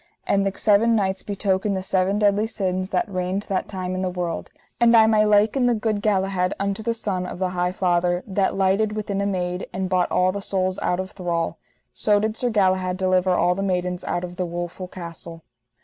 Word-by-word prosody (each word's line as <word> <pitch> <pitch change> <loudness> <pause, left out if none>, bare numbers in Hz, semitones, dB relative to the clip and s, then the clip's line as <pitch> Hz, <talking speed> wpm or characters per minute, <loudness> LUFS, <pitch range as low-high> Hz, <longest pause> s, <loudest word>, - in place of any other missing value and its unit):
And 200 0 +2
the 195 - -4
seven 220 +2 +4
knights 190 -2 0
betoken 200 0 -1
the 190 - -3
seven 190 +1 +1
deadly 210 +1 +2
sins 185 -3 -2
that 185 - 0
reigned 185 0 -2
that 195 - -1
time 185 -2 -4
in 185 - -2
the 185 - 0
world; 180 -2 -4 0.3
and 235 -1 +6
I 220 - +7
may 215 -1 +4
liken 215 +5 +3
the 240 - +3
good 215 -1 -1
Galahad 195 -2 +1
unto 200 +1 -1
the 230 +1 -1
son 185 -5 -2
of - - -6
the 185 0 -1
High 180 0 -1
Father, 175 -1 +1
that 195 -1 0
lighted 195 +2 +2
within 205 -2 -2
a 200 - 0
maid, 180 -2 -2
and 185 0 -3
bought 180 -1 +1
all 185 0 +2
the 200 +1 -5
souls 185 -1 -1
out 180 - 0
of 190 +1 -4
thrall, 170 -3 -2 0.3
so 205 +12 +2
did 215 +1 -1
Sir 245 +1 -1
Galahad 185 -4 +1
deliver 185 0 +2
all 180 0 +3
the 195 - -4
maidens 180 -2 -1
out 175 - -2
of 180 0 -7
the 180 - -1
woful 175 +2 -5
castle. 170 -2 -8
190 Hz, 210 wpm, -23 LUFS, 180-205 Hz, 0.3 s, I